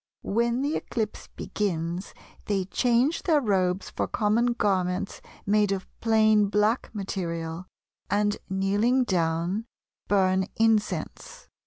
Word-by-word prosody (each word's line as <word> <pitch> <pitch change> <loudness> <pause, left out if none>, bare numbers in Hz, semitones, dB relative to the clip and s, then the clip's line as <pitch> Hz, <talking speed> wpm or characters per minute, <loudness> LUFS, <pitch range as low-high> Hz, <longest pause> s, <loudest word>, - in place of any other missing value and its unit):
When 235 +4 0
the 290 +2 0
eclipse 220 -3 -3
begins 175 -2 -3 0.3
they 195 -3 0
change 245 - +1
their 315 -4 +3
robes 190 -6 0
for - - -2
common 230 +3 +1
garments 185 -4 -1 0.2
made 205 0 +3
of 195 -1 -2 0.2
plain 215 -2 +4
black 210 +4 +1
material, 170 -4 -4 0.4
and 205 0 +1
kneeling 205 +7 +2
down, 175 +1 0 0.4
burn 190 -1 +2
incense. 225 - -1
205 Hz, 110 wpm, -26 LUFS, 185-225 Hz, 0.4 s, plain